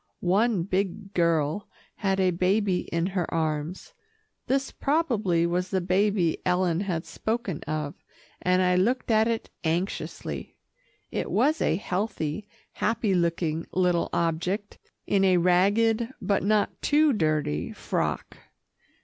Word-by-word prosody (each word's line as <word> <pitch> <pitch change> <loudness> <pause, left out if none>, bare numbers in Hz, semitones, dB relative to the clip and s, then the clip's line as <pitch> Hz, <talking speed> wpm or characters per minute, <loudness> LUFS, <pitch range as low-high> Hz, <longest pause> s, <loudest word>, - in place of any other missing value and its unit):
One 210 -3 +2
big 195 +2 -2
girl 170 +1 +1 0.3
had 195 -1 0
a 185 -1 +3
baby 185 +2 +1
in 170 0 0
her 185 -2 -2
arms. 160 - -2 0.5
This 270 +1 0
probably 225 - +1
was 180 +2 -1
the 190 - +1
baby 185 -1 +1
Ellen 180 -2 +1
had 180 -5 -2
spoken 220 -7 -3
of, 150 -1 -2 0.5
and 185 0 +3
I 180 0 +3
looked 240 +6 +1
at 220 0 +4
it 230 -1 -2
anxiously. 170 +4 -3 0.5
It - - -2
was 310 +2 +2
a 155 - +2
healthy, 190 -1 -3 0.2
happy 215 -2 0
looking 165 -2 0
little 180 -2 +2
object 170 +5 -1 0.3
in 195 -1 +2
a 185 -2 +5
ragged, 205 +7 +3
but 200 -1 +1
not 210 +1 +1
too 295 0 +4
dirty 155 - 0
frock. - - -3
185 Hz, 125 wpm, -26 LUFS, 170-210 Hz, 0.5 s, a